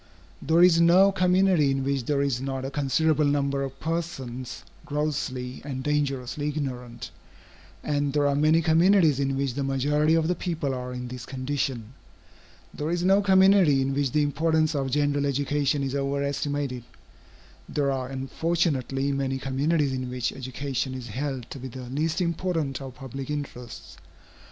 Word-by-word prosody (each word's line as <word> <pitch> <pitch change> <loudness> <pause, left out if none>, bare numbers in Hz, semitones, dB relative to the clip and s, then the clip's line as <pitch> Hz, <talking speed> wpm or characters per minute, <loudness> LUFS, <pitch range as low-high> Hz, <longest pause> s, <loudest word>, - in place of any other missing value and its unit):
There 165 +3 +4
is 170 -2 +6
no 185 +4 +6
community 185 -4 +3
in 135 0 0
which 135 -2 -1
there 140 0 +1
is 130 -3 -1
not 135 -1 -3
a 135 - -4
considerable 150 +2 +1
number 140 -1 +1
of 135 0 -5
persons 145 -7 -4 0.2
grossly 140 -4 -3
and 135 -2 -5
dangerously 145 -1 -1
ignorant, 125 -5 -5 0.7
and 145 -1 0
there 145 0 +1
are 140 - +3
many 155 +3 +3
communities 165 -2 +4
in 135 -1 0
which 135 -2 -1
the 140 +2 -2
majority 145 +4 +2
of 160 -1 +2
the 180 - +2
people 165 -6 -2
are 125 0 -5
in 125 0 -5
this 125 -1 -7
condition. 130 -3 -3 0.8
There 150 +1 -3
is 175 +1 -1
no 195 +2 +4
community 190 -6 +5
in 135 +1 0
which 140 -2 0
the 150 +2 +2
importance 155 +2 +1
of 135 -2 -1
general 145 +1 +1
education 140 +1 0
is 135 -1 -2
over 140 0 -1
estimated; 140 -3 -2 0.9
there 140 -2 0
are 130 -1 -2
unfortunately 135 0 -1
many 135 -1 -1
communities 140 +2 0
in 130 -1 -3
which 125 -1 -2
education 130 0 -4
is 125 -2 -7
held 130 +1 -4
to 140 - -7
be 130 - -6
the 130 +1 -8
least 155 +6 -1
important 170 -5 -1
of 130 -2 -8
public 135 0 -7
interests. 140 -5 -6
140 Hz, 160 wpm, -26 LUFS, 130-155 Hz, 0.9 s, is